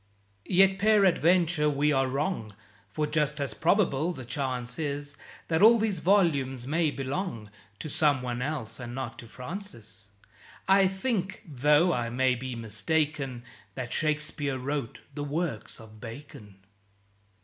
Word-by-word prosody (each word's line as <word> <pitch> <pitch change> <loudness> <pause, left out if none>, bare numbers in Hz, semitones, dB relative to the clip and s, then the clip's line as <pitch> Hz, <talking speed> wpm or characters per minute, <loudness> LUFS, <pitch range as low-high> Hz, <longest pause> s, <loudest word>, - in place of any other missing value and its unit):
Yet 190 +1 +4
peradventure 180 -6 +4
we 145 +1 +2
are 135 -1 +2
wrong, 135 - -2 0.3
For 150 +9 -1
just 150 0 0
as 140 -5 -2
probable 165 - +2
the 130 -6 -9
chance 125 -1 -3
is 145 -1 -3 0.3
That 160 +1 +1
all 230 +3 +8
these 215 -5 0
volumes 145 -10 +2
may 155 +3 +1
belong 135 - -4 0.3
To - - -6
someone 130 -6 +1
else, 130 -5 -4
and 120 -1 -6
not 130 -3 -5
to 115 - -10
Francis. 120 - -9 0.6
I 195 0 +6
think, 195 0 -2
tho' 150 +5 +3
I 120 -3 -1
may 130 +2 +2
be 125 0 -5
mistaken, 135 +3 -2 0.3
That 125 -2 -4
Shakespeare 150 -3 -1
wrote 135 -2 -4
the 145 0 -4
works 145 -5 -3
of 110 -1 -14
Bacon. 115 -4 -10
145 Hz, 135 wpm, -28 LUFS, 125-170 Hz, 0.6 s, all